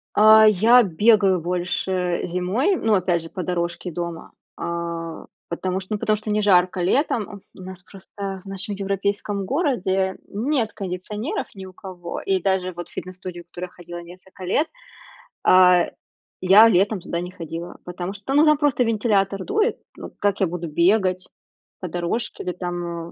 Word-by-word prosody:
А, 215 +1 +8
я 225 +5 +6
бегаю 200 0 +3
больше 180 +1 -1
зимой, 185 - 0
ну 225 -9 +2
опять 180 -2 +1
же, 165 - -10
по 185 - -5
дорожке 175 +1 -3
дома, 170 0 -6 0.3
а, 170 -1 -4 0.2
потому 185 +2 -2
что, 190 +3 -6
ну, 210 - -2
потому 215 - +2
что 215 0 -5
не 210 0 +1
жарко 185 -2 +3
летом, 205 - 0
у - - -12
нас 185 0 -10
просто 195 0 -8
в - - -35
нашем 195 +2 -4
европейском 200 +1 -2
городе 195 - 0
нет 230 +1 -1
кондиционеров 200 - -4
ни 190 -1 -9
у 185 - -12
кого, 180 -3 -7
и 190 -1 0
даже, 190 0 0
вот, 175 0 -8
в - - -20
фитнес-студию, 180 -1 -7
в 170 - -47
которую 180 +1 -7
я - - -26
ходила 175 0 -9
несколько 180 +2 -12
лет. 290 - +1 0.8
А, 180 -1 +6 0.6
я 205 +5 +8
летом 200 0 +2
туда 170 0 -4
не 180 +1 -6
ходила, 170 0 -7
потому 180 +1 -5
что 205 0 -14
та 270 - -1
ну, 295 +2 +6
там 305 -1 +5
просто 290 -4 +2
вентилятор 205 -4 +1
дует, 430 +3 +1 0.2
ну - - -8
как 205 -1 0
я 190 - +4
буду 175 0 -5
бегать 185 +3 +2 0.5
по 185 - -5
дорожке 175 +7 -3
или 180 - -2
там, 175 -2 -5
190 Hz, 170 wpm, -22 LUFS, 175-210 Hz, 0.8 s, А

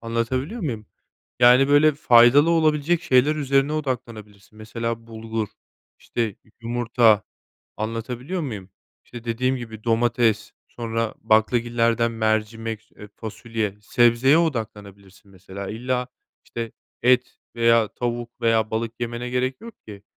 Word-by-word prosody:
anlatabiliyor 130 - -2
muyum? 115 - -4 0.5
Yani, 125 +3 +6
böyle, 145 +1 +5
faydalı 130 +3 +5
olabilecek 160 0 +2
şeyler 130 +4 +3
üzerine 140 0 +1
odaklanabilirsin. 110 -8 -6
Mesela, 115 +1 -5
bulgur, 110 -1 -4 0.5
işte, 120 - -4
y 110 -4 -2 0.3
yumurta, 115 -2 +2 0.5
anlatabiliyor 120 - -4
muyum? 105 - -6 0.3
İşte, 120 -1 -11
dediğim 125 +3 0
gibi, 110 -3 -9
domates, 115 -2 +1 0.2
sonra 115 -1 -3
baklagillerden 115 +1 +2
mercimek, 110 0 -2
s - - -32
eee, 105 - -10
fasulye, 110 -2 -4
sebzeye 120 +6 +3
odaklanabilirsin, 100 - -4
mesela. 95 +1 -9
İlla, 125 +2 -2 0.4
işte, 115 -1 -6 0.3
et 125 0 +2 0.2
veya 115 -1 +4
tavuk 120 0 -5
veya 115 -2 +2
balık 115 +1 -2
yemene 120 +1 -4
gerek 130 +1 -1
yok 230 -1 -10
ki, 100 -2 -11
115 Hz, 120 wpm, -23 LUFS, 110-125 Hz, 0.5 s, Yani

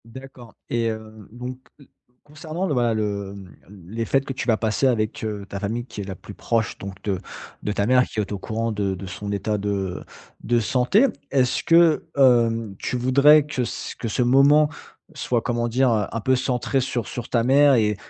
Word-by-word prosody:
D'accord 125 0 -12 0.2
et 115 -1 +1
heu, 110 -2 -8
donc, 125 +2 -7 0.2
heu, 140 - -17 0.4
concernant 155 +4 -5
le 165 - -1
voilà, 120 -3 +1
le, 100 -2 -2
hem, 95 -2 -12
mmh 95 -3 -14
les 115 +1 -2
fêtes 135 +5 +1
que 135 - -4
tu 130 - -5
vas 115 -2 +3
passer 110 +5 +1
avec, 110 -4 -1
heu, 105 -2 -4
ta 100 - -6
famille 110 +4 -3
qui 105 - -8
est - - -4
la 95 -1 -6
plus - - -12
proche 115 -1 -1
donc 95 0 -8
de 100 -3 -1 0.4
de 105 - -2
ta 100 0 0
mère 125 +2 +4
qui 110 - -6
est 105 -1 -2
au 100 - -3
courant 115 +3 -2
de 100 -2 -1
de 95 - -8
son 100 +3 -6
état 105 +1 -1
de 100 -2 -3 0.4
de 120 +1 +2
santé, 125 - +3 0.2
est-ce 130 -3 +1
que, 165 -2 +4
hem, 115 -5 +3
tu 125 - -2
voudrais 140 +4 +5
que 140 -4 -2
c - - -5
que 115 - -3
ce 115 +3 0
moment 140 +4 +5 0.4
soit, 125 -5 -1
comment 120 0 -1
dire? 125 +2 +2
Heu, 105 -3 +1
un 115 - -3
peu 130 +4 +2
centré 130 +1 0
sur 125 -4 -3
sur 120 -1 -6
ta 115 -2 +1
mère 140 +2 +5
et 105 -3 +2
115 Hz, 210 wpm, -23 LUFS, 105-130 Hz, 0.4 s, voudrais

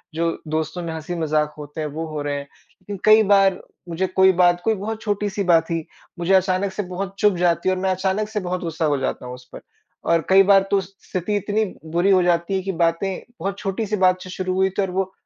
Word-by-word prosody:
जो 165 0 -1
दोस्तों 155 +3 -2
में 165 - -4
हँसी-मज़ाक 155 -2 -1
होते 150 +1 -7
हैं 155 - -2
वो 160 +3 -5
हो 155 -2 -5
रहे 145 0 -2
हैं। 140 - -5
लेकिन 185 +7 -12
कई 215 +1 +7
बार 195 -2 +4 0.3
मुझे 175 +3 -1
कोई 190 +1 +4
बात 175 0 +4
कोई 225 - +2
बहुत 215 +2 -5
छोटी-सी 205 -1 -2
बात 170 -3 +4
थी, 165 -2 -3 0.3
मुझे 175 +3 +1
अचानक 190 +1 +2
से 205 - -3
बहुत 190 +2 -5
चुभ 205 -4 +3
जाती 175 +1 +1
है 185 - +2
और 185 - -5
मैं 190 - +1
अचानक 190 +3 -1
से 215 -1 -2
बहुत 180 -1 -3
गुस्सा 165 -1 -2
हो 145 -2 +1
जाता 130 -1 -3
हूँ 125 - -6
उस 125 0 -15
पर। - - -9 0.5
और 165 -1 +4
कई 195 +1 +7
बार 195 0 +5
तो 200 - +4
उस 195 +1 -5
स्थिति 185 +3 -2
इतनी 210 +2 0 0.3
बुरी 175 +4 +2
हो 185 -1 +5
जाती 170 +1 +1
है 190 - 0
कि 195 - -2
बातें 170 +3 0 0.2
बहुत 195 +3 -3
छोटी-सी 210 +2 -2
बात 185 0 +3
से 185 - -10
शुरू 185 0 -3
हुई 190 0 +2
थी 190 +2 -2
और 190 - -2
वो 190 0 -1
185 Hz, 240 wpm, -22 LUFS, 165-195 Hz, 0.5 s, कई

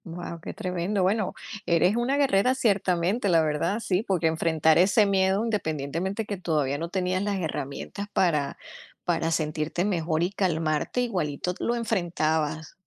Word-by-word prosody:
Guau, 170 -1 -7
qué - - -6
tremendo. 185 0 -1
Bueno, 200 +1 +1 0.3
eres 175 +4 +3
una 245 +4 +1
guerrera 255 -3 +3
ciertamente, 200 -3 +1
la 165 -2 +4
verdad, 155 +7 0
sí, 190 -4 0
porque 185 -6 0
enfrentar 160 -1 +2
ese 200 +4 +5
miedo, 195 +1 +2
independientemente 180 0 -2
que 205 -1 -4
todavía 150 -6 0
no 170 +1 -4
tenías 185 0 -1
las 200 -1 -1
herramientas 160 +5 -4
para 150 -6 +1 0.5
para 165 -1 0
sentirte 155 +1 -1
mejor 165 -5 0
y 180 - 0
calmarte, 165 +2 0
igualito 180 -7 -2
t - - -8
lo 240 - +1
enfrentabas. 160 -8 -1
180 Hz, 150 wpm, -26 LUFS, 160-200 Hz, 0.5 s, ese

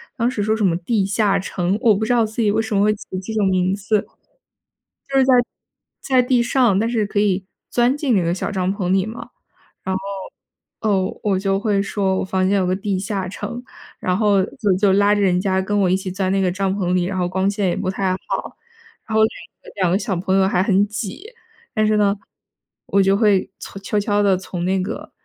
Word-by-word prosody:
当 240 -1 +1
时 220 -5 -3
说 215 +2 +1
什 215 - -2
么 170 -2 +2
地 195 +2 0
下 200 -1 +1
城， 185 0 -1
我 220 -4 +5
不 215 - -2
知 245 - +1
道 230 -2 +3
自 220 +2 -4
己 210 -2 +3
为 220 +1 +1
什 220 -2 -3
么 200 - +3
会 215 0 +3
起 - - -12 0.2
这 220 - -5
种 205 -3 +2
名 185 0 +1
字。 210 +1 -1 1.0
就 275 0 +1
是 265 - +5
在 260 - +3 0.7
在 255 -2 +2
地 245 -1 +2
上， 235 -5 +2
但 225 +2 +1
是 225 -3 0
可 205 - -3
以 195 -2 +1 0.3
钻 245 +3 +2
进 285 -5 0
那 185 - +2
个 170 +1 0
小 185 - -3
帐 185 -1 0
篷 185 -3 -2
里 190 0 +3
嘛。 225 +2 -8 0.5
然 190 - -1
后， - - 0 0.8
呃， 195 -4 0
我 195 -3 +1
就 195 0 0
会 205 -2 +1
说 195 -1 -1
我 - - -1
房 185 0 0
间 200 - +2
有 185 - +1
个 185 +1 +1
地 195 -1 -2
下 195 -1 -3
城， 210 +6 -6 0.4
然 180 0 0
后 205 -3 +3
就 200 0 -1
就 195 -1 +3
拉 205 +1 +4
着 205 - 0
人 180 -2 +2
家 190 0 +1
跟 205 +2 -1
我 190 - +3
一 185 - +3
起 190 0 -4
钻 190 0 -1
那 195 0 +1
个 180 -1 +1
帐 195 +1 -1
篷 180 -3 -1
里， 180 -1 +2
然 190 +1 -3
后 180 -1 0
光 190 +1 0
线 200 -2 0
也 - - -1
不 195 -1 -2
太 190 0 -1
好， 185 - -5 0.5
然 220 - -3
后 220 - +4
2 220 - +4 0.3
个 - - -12
2 175 -2 +2
个 190 - +3
小 195 -3 -2
朋 190 +2 0
友 190 0 +4
还 185 -1 +1
很 200 0 +3
挤。 210 - -6 0.5
但 215 -1 +2
是 215 0 +2
呢， 205 0 +2 0.7
我 200 - +3
就 195 +1 +3
会 205 -3 +2
从 195 - -9
悄 205 +1 -1
悄 205 0 +1
地 195 -2 +4
从 180 -2 -5
那 190 0 +1
个 200 +4 -6
195 Hz, 250 characters per minute, -20 LUFS, 190-215 Hz, 1.0 s, 我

